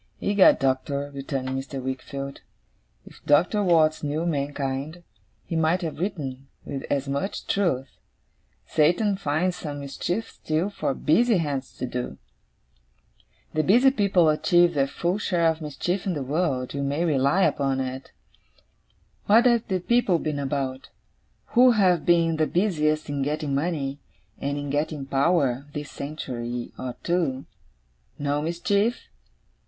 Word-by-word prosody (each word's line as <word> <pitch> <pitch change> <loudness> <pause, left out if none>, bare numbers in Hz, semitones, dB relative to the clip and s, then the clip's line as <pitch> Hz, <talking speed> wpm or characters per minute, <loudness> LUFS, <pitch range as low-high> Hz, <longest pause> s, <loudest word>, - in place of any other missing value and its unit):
'Egad, 200 -2 +5
Doctor,' 140 +2 -1
returned 135 -1 -4
Mr. 135 +1 -4
Wickfield, 135 +1 -5 0.6
'if - - -15
Doctor 175 +8 +3
Watts 160 -5 +3
knew 150 +3 -2
mankind, 145 +1 -3 0.4
he 165 - -4
might 165 +3 +2
have 160 -2 -4
written, 140 -8 -4 0.2
with 135 -1 -4
as 140 -1 0
much 140 +8 -3
truth, 135 -10 -1 0.7
"Satan 180 +7 +2
finds 180 0 -1
some 145 -2 -5
mischief 175 +10 -3
still, 160 +6 -2
for 140 -8 -2
busy 225 +7 +3
hands 145 -5 -3
to - - -3
do." 125 0 -4 1.4
The 155 - +2
busy 245 +11 +5
people 200 - +3
achieve 175 +2 +3
their 140 -2 +2
full 175 +7 -1
share 175 -5 +1
of 160 0 0
mischief 175 +6 -3
in 185 - 0
the 145 - -3
world, 135 -3 -1
you 140 - -3
may 140 +5 0
rely 145 +4 +2
upon 135 -5 +1
it. 130 0 -5 1.2
What 225 +4 +6
have 235 -2 +3
the 190 -2 0
people 235 -4 +2
been 150 -2 -3
about, 135 -1 -3 0.6
who 250 0 +7
have 185 -6 +2
been 165 -2 +3
the 155 -1 +2
busiest 155 -5 +1
in 145 -1 -2
getting 150 +1 -1
money, 140 -2 -1 0.4
and 140 +1 -2
in 145 -1 -4
getting 145 -1 -2
power, 140 -2 +1
this 150 0 -6
century 125 -5 -5
or 125 -1 -5
two? 160 -7 0 0.7
No 145 0 -1
mischief? 200 +8 0
150 Hz, 140 wpm, -25 LUFS, 140-175 Hz, 1.4 s, who